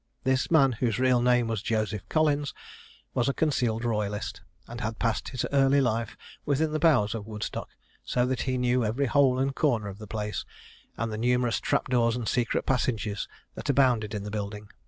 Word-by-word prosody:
This 130 Hz, -1 st, +1 dB
man 140 Hz, -5 st, +5 dB
whose 115 Hz, -2 st, -1 dB
real 130 Hz, -1 st, +3 dB
name 125 Hz, -1 st, +3 dB
was 110 Hz, -3 st, -2 dB
Joseph 110 Hz, -3 st, -2 dB
Collins, 150 Hz, -2 st, +1 dB, 0.6 s
was 125 Hz, +1 st, +1 dB
a 140 Hz, -, -1 dB
concealed 120 Hz, -7 st, 0 dB
royalist, 105 Hz, -3 st, -2 dB, 0.3 s
and 120 Hz, +1 st, -7 dB
had 110 Hz, 0 st, -3 dB
passed 115 Hz, -2 st, -1 dB
his 130 Hz, -2 st, -2 dB
early 140 Hz, 0 st, +4 dB
life 115 Hz, -4 st, 0 dB, 0.3 s
within 150 Hz, +2 st, +1 dB
the 155 Hz, -, -1 dB
bowers 150 Hz, -10 st, +3 dB
of 110 Hz, -2 st, -6 dB
Woodstock; 105 Hz, -1 st, -5 dB, 0.3 s
so 125 Hz, -, +1 dB
that 130 Hz, -1 st, -1 dB
he 130 Hz, -1 st, -1 dB
knew 125 Hz, 0 st, +2 dB
every 115 Hz, +6 st, 0 dB
hole 135 Hz, -1 st, +3 dB
and 135 Hz, +1 st, 0 dB
corner 120 Hz, -9 st, +1 dB
of 100 Hz, +1 st, -9 dB
the 110 Hz, -, -9 dB
place, 105 Hz, 0 st, -3 dB, 0.5 s
and 115 Hz, -1 st, -2 dB
the 110 Hz, -, -4 dB
numerous 125 Hz, 0 st, +1 dB
trap -, -, 0 dB
doors 120 Hz, -2 st, +2 dB
and 120 Hz, -3 st, -4 dB
secret 120 Hz, +1 st, 0 dB
passages 115 Hz, -5 st, -1 dB, 0.3 s
that -, -, -7 dB
abounded 125 Hz, -6 st, +2 dB
in 100 Hz, -, -4 dB
the 105 Hz, -, -6 dB
building. 105 Hz, 0 st, -5 dB
120 Hz, 190 wpm, -27 LUFS, 110-130 Hz, 0.6 s, man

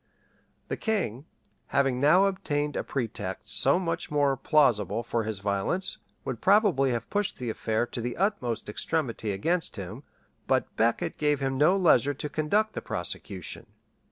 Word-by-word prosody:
The -, -, -3 dB
king, 160 Hz, -, -1 dB, 0.4 s
having 135 Hz, -2 st, +1 dB
now 160 Hz, +8 st, +5 dB
obtained 150 Hz, -7 st, -1 dB
a -, -, -1 dB
pretext 125 Hz, -5 st, -4 dB
so -, -, +3 dB
much 170 Hz, -2 st, -2 dB
more 145 Hz, -2 st, +2 dB
plausible 125 Hz, -, +2 dB
for 115 Hz, -1 st, -1 dB
his 110 Hz, -1 st, -3 dB
violence, 100 Hz, -, -1 dB, 0.3 s
would 115 Hz, -4 st, -4 dB
probably 190 Hz, -, +4 dB
have 120 Hz, -2 st, -2 dB
pushed 205 Hz, 0 st, 0 dB
the 120 Hz, -3 st, -3 dB
affair 110 Hz, +1 st, -1 dB
to 120 Hz, 0 st, -6 dB
the 120 Hz, +1 st, -4 dB
utmost 175 Hz, -, -1 dB
extremity 115 Hz, -1 st, -2 dB
against 165 Hz, -, -1 dB
him; 100 Hz, +5 st, -7 dB, 0.5 s
but -, -, 0 dB
Becket 115 Hz, +1 st, 0 dB
gave 150 Hz, -2 st, +2 dB
him 135 Hz, -1 st, -1 dB
no 155 Hz, +8 st, +4 dB
leisure 145 Hz, -6 st, +4 dB
to 150 Hz, -, -5 dB
conduct 205 Hz, +10 st, +1 dB
the -, -, -4 dB
prosecution. -, -, -5 dB
140 Hz, 155 wpm, -28 LUFS, 115-170 Hz, 0.5 s, now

